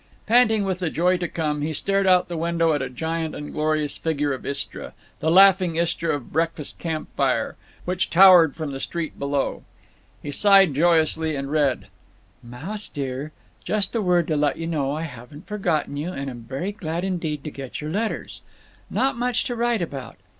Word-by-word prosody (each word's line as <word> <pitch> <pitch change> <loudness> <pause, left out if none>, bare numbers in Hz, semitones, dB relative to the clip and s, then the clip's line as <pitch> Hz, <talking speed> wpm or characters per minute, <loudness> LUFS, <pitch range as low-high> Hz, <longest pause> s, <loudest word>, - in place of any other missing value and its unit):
Panting 220 -3 +4
with 190 -1 -2
the 180 -3 -1
joy 180 +3 +2
to 175 -1 -2
come, 150 -3 -2
he 155 +2 -2
stared 195 +4 0
out 180 -1 +5
of - - -28
the 175 - -5
window 165 0 +1
at 145 - 0
a 135 - -3
giant 160 +4 -3
and 150 - -7
glorious 155 -1 -1
figure 145 -3 0
of 130 - -7
Istra—the 140 +2 -5
laughing 185 -1 +6
Istra 170 -1 0
of 140 -4 -9
breakfast 165 -1 -2
camp 160 -2 -4
fire—which 180 +1 -2
towered 175 -4 +7
from 155 -3 -4
the 135 - -5
street 165 +2 -4
below. 140 0 -1 0.6
He 145 - -4
sighed 195 0 +5
joyously 160 0 +2
and 140 0 -4
read: 145 -4 +1 0.6
Mouse 150 - -7
dear, 140 +1 -5 0.3
just 205 -3 -1
a 230 - 0
word 180 -3 +2
to 155 - +1
let 145 0 +1
you 165 - -4
know 150 -5 -1
I 155 +3 -3
haven't 145 - -10
forgotten 175 -9 -1
you 155 +5 -3
and 140 -5 -5
am 120 -2 -11
very 140 +9 -3
glad 170 -4 -4
indeed 165 -6 -2
to 150 - -5
get 135 -3 -7
your 150 +1 -5
letters. 215 +5 -3 0.5
Not 265 -2 0
much 245 0 0
to 245 - -3
write 235 -4 +1
about. 135 -7 -7
160 Hz, 185 wpm, -23 LUFS, 145-185 Hz, 0.6 s, towered